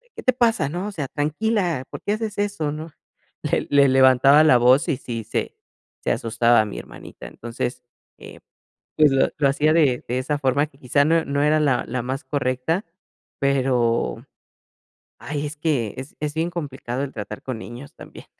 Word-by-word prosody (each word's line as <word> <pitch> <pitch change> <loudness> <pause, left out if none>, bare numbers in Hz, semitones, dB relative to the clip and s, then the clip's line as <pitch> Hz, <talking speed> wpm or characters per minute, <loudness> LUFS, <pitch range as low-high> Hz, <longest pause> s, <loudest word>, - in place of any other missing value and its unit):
"¿Qué - - -9
te 255 - +3
pasa? 230 - +1
¿No? 180 +6 -4
O - - -4
sea, 145 -6 -4
tranquila, 170 - -1
¿por - - -7
qué 205 - 0
haces 215 -1 -4
eso?". 200 -8 -1
¿No? 155 +2 -6 0.5
Le - - -1
le 140 -1 +5
levantaba 130 +3 +6
la 130 -5 +6
voz, 130 +7 +4
y 145 - +2
sí, 115 -4 -5
se - - -3 0.5
se - - 0
asustaba 115 0 +3
mi 105 - -7
hermanita, - - -11
entonces, 120 +1 -5 0.4
eh, - - -12 0.6
pues, 150 -2 +5
lo 135 0 +3
lo 140 -2 +3
hacía 150 +3 +2
de 140 -7 +2
de 125 +2 -1
esa 145 +3 -1
forma, 140 +2 +1
que 140 - -25
quizá, 140 +3 +2
no 165 +1 +2
no 140 0 -1
era 155 +1 +3
la 140 -5 +2
la 125 0 -2
más 130 +4 -4
correcta, 140 +6 -1 0.5
pero, 130 -4 +1 0.9
ay 150 0 -4
es 150 0 -9
que, 140 -9 -1
es 130 +2 -8
es 150 -1 -3
bien 165 +2 0
complicado, 135 -6 -4
el 140 - -5
tratar 105 -1 -7
con 125 -4 -5
niños 120 +5 -10
también. - - -12
140 Hz, 185 wpm, -22 LUFS, 125-155 Hz, 0.9 s, levantaba